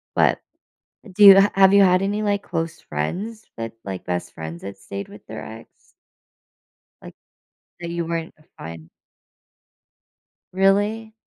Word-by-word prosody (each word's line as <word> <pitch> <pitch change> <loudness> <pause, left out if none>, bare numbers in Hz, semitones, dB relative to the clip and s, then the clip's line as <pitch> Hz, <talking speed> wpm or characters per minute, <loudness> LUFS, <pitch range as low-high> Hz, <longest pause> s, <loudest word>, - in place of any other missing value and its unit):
but, - - +3 0.6
eh, 215 - -14
do 210 - +4
you 195 -1 +11
ha 200 - +3
have 195 0 +6
you 200 - +7
had 185 -1 +4
any, 205 +2 -1
like, 205 -1 -1
close 165 -2 -4
friends 200 - -5
that, 115 0 -5
like, 95 -2 -7
best 90 -1 -4
friends 80 +1 -7
that 100 0 -8
stayed 100 0 -7
with - - -14
their - - -8
ex? 110 +1 -14 1.1
Like, - - -11 0.7
that 170 -1 -6
you 170 0 -3
weren't 165 0 -4 0.2
fine. 80 0 -10 1.7
Really? 205 +4 +1
175 Hz, 145 wpm, -22 LUFS, -, 1.7 s, you